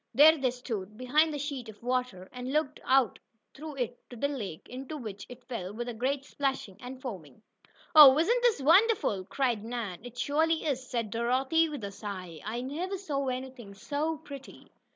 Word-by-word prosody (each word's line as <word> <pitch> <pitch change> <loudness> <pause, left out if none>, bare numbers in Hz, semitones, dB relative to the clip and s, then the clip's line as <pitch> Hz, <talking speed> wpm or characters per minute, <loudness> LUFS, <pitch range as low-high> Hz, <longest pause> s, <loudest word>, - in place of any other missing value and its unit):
There 310 +3 +8
they 270 -4 +1
stood, 220 -5 -5
behind 300 +6 +3
the 295 - -3
sheet 275 -5 -4
of 215 +1 -13
water, 250 -7 -1
and 250 +1 -5
looked 300 -1 0
out 260 -5 +3 0.3
through 305 +1 -8
it 245 -2 -3
to 245 - -9
the 260 +5 0
lake, 205 - -5
into 265 +4 -6
which 210 -6 -7
it 250 0 -11
fell 195 -7 -5
with 240 +3 -4
a 240 - -3
great 265 +4 -1
splashing 265 -10 -3
and 255 +1 -8
foaming. 195 - -8 0.5
"Oh, 295 -4 +10
isn't 465 +10 +3
this 465 - +2
wonderful!" 330 - +4
cried 240 -2 0
Nan. 225 -6 -4
"It 245 0 -10
surely 320 +5 +1
is," 260 -4 -2
said 230 -4 -2
Dorothy, 260 +8 +2
with 290 -7 -6
a 200 - -4
sigh. 185 -6 -7
"I 225 +4 -3
never 335 +9 -3
saw 285 -8 -2
anything 255 -5 -5
so 300 +9 -2
pretty." 280 -3 -11
255 Hz, 185 wpm, -30 LUFS, 225-290 Hz, 0.5 s, Oh